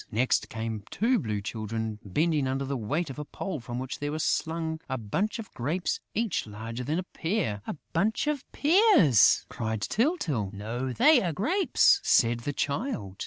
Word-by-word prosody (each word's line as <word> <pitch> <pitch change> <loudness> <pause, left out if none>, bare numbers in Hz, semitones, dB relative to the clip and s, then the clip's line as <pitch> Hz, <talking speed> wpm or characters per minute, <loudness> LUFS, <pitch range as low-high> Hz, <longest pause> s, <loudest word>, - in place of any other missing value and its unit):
Next 120 +4 +1
came 110 -1 -4
two 240 +2 +2
Blue 105 - -2
Children 110 0 -4
bending 150 - +1
under 135 +1 -1
the 140 +1 -2
weight 140 +7 -2
of 135 - -8
a - - -3
pole 170 +2 -5
from 120 0 -6
which 130 +1 -5
was 150 +2 -2
slung 160 0 -1
a 130 - -1
bunch 160 - -2
of 225 -3 -9
grapes 160 +9 -1 0.2
each 220 - -1
larger 115 +3 -6
than 150 +6 -1
a 185 - -1
pear. 165 - -2
"A - - -3 0.2
bunch 205 - +1
of 295 -3 -1
pears!" 320 - +5
cried 110 -2 -3
Tyltyl. 160 - 0
"No, 115 +6 -4
they 295 - +5
are 175 - -1
grapes," 360 - +3
said 120 - +3
the 145 +5 -4
Child. 140 - -3
140 Hz, 170 wpm, -28 LUFS, -, 0.2 s, pears